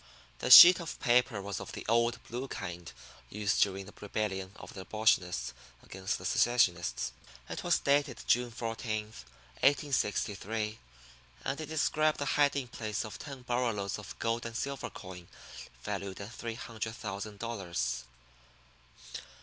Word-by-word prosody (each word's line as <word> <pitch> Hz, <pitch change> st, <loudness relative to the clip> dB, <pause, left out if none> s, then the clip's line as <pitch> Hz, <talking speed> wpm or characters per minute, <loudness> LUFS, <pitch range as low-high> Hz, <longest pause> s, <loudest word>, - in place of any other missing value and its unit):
The -, -, -2 dB
sheet 180 Hz, +1 st, +12 dB
of 170 Hz, -2 st, -6 dB
paper 120 Hz, -4 st, +2 dB
was 100 Hz, 0 st, -4 dB
of -, -, -8 dB
the -, -, -7 dB
old, 115 Hz, +2 st, +2 dB
blue 125 Hz, +4 st, -4 dB
kind 90 Hz, -7 st, -6 dB, 0.4 s
used 105 Hz, +1 st, 0 dB
during 95 Hz, -1 st, +1 dB
the 100 Hz, -, -13 dB
rebellion 100 Hz, -2 st, -3 dB
of -, -, -11 dB
the 95 Hz, -, -7 dB
abolitionists 90 Hz, -, +1 dB, 0.3 s
against 95 Hz, 0 st, -3 dB
the -, -, -10 dB
secessionists. 90 Hz, -, +2 dB, 0.4 s
It -, -, -5 dB
was -, -, +3 dB
dated 140 Hz, -2 st, +1 dB
June 125 Hz, 0 st, +2 dB
14, 115 Hz, -2 st, -3 dB, 0.6 s
1863, 110 Hz, -6 st, 0 dB, 0.7 s
and 140 Hz, +3 st, -2 dB
it 155 Hz, -, -5 dB
described 155 Hz, 0 st, +1 dB
the 145 Hz, -, -2 dB
hiding 140 Hz, -3 st, +2 dB
place 110 Hz, -3 st, -3 dB
of 110 Hz, -, -8 dB
ten 135 Hz, -3 st, -8 dB
burro 125 Hz, 0 st, 0 dB
loads 100 Hz, 0 st, -3 dB
of 105 Hz, -, -10 dB
gold 115 Hz, +1 st, -1 dB
and 115 Hz, 0 st, -5 dB
silver 140 Hz, 0 st, -3 dB
coin 90 Hz, -3 st, -10 dB, 0.6 s
valued 100 Hz, -1 st, -4 dB
at 100 Hz, +4 st, -8 dB
three 115 Hz, -1 st, -5 dB
hundred 110 Hz, -1 st, -5 dB
thousand 105 Hz, -1 st, -6 dB
dollars. 90 Hz, -, -3 dB
110 Hz, 145 wpm, -31 LUFS, 100-125 Hz, 0.7 s, sheet